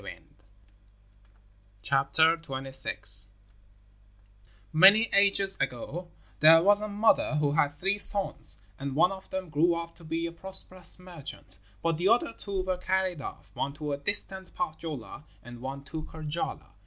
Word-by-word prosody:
] - - -17 1.8
KULLERVO'S 135 +4 0 0.7
BIRTH 100 -1 0 1.5
Many 195 +7 +8
ages 200 -1 +4
ago 135 +7 -4 0.3
there 165 +2 +7
was 205 +2 +4
a 215 - -3
mother 205 -6 +2
who 150 -1 +1
had 145 -1 +1
three 195 +5 0
sons, 200 - +3 0.2
and 135 -1 -5
one 180 +5 +4
of 190 0 -10
them 190 -2 -5
grew 165 +3 +2
up 170 0 -6
to 170 - -17
be 165 +1 -3
a 170 - -4
prosperous 185 +1 -1
merchant, 165 - -10 0.2
but 165 -1 0
the 180 - +1
other 230 0 +2
two 195 -2 -4
were 185 -1 -2
carried 185 -3 -1
off - - -9
one 140 - -3
to 150 -1 -4
distant 190 +3 -1
Pohjola 155 - -6 0.2
and 120 -1 -11
one 135 +1 -6
to 155 +2 -7
Karjala. 155 +1 -6
165 Hz, 140 wpm, -28 LUFS, 145-190 Hz, 1.8 s, Many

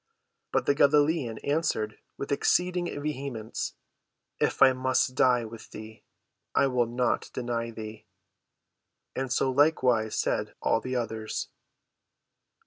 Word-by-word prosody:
But - - +1
the - - +4
Galilean 145 -4 +3
answered 140 -8 -1 0.2
with 140 - -5
exceeding 180 +4 +2 0.2
vehemence, 135 -7 -4 0.6
"If - - +3
I 130 -1 +7
must 130 0 +1
die 125 -2 +3
with 110 0 -10
thee, 110 0 -11 0.5
I - - +5
will 125 -3 +1
not 120 +1 0
deny 120 -1 -2
thee!" 110 -1 -9 1.1
And 130 -1 -2
so 130 0 +2
likewise 130 -6 +3
said - - -1
all 115 - +1
the 130 0 -4
others. 110 -2 -3
125 Hz, 120 wpm, -28 LUFS, 115-140 Hz, 1.1 s, I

